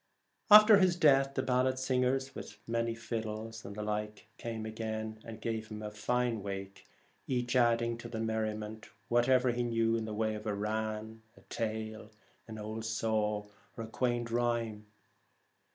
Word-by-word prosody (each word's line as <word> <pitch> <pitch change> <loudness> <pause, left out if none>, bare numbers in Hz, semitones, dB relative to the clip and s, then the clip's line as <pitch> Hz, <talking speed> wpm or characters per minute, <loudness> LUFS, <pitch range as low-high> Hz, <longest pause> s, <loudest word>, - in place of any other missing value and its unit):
After 215 0 +10
his 185 -2 +4
death 135 -4 +4
the - - 0
ballad 130 0 +2
singers, 130 +1 +1
with - - -8
many 115 0 0
fiddles 110 -1 -5
and 100 - -8
the 105 - -4
like, 105 +1 -4
came 115 -2 -4
again 110 0 -4
and 115 -1 -8
gave 110 -1 -3
him 110 0 -7
a 105 - -4
fine 120 +1 0
wake, 95 0 -6 0.4
each 125 -1 -1
adding 115 -1 +3
to - - -7
the 110 - -4
merriment 110 -1 -3 0.2
whatever 125 +1 +4
he 120 +1 -1
knew 115 -1 +1
in 115 -1 -1
the 110 -1 -4
way 110 0 0
of 105 +1 -6
rann, 110 +1 -2 0.3
tale, 110 -1 -3 0.5
old 110 +1 -5
saw, 110 -1 0 0.3
or 115 - -4
quaint 120 0 -1
rhyme. 115 -3 -1
110 Hz, 150 wpm, -32 LUFS, 110-120 Hz, 0.5 s, After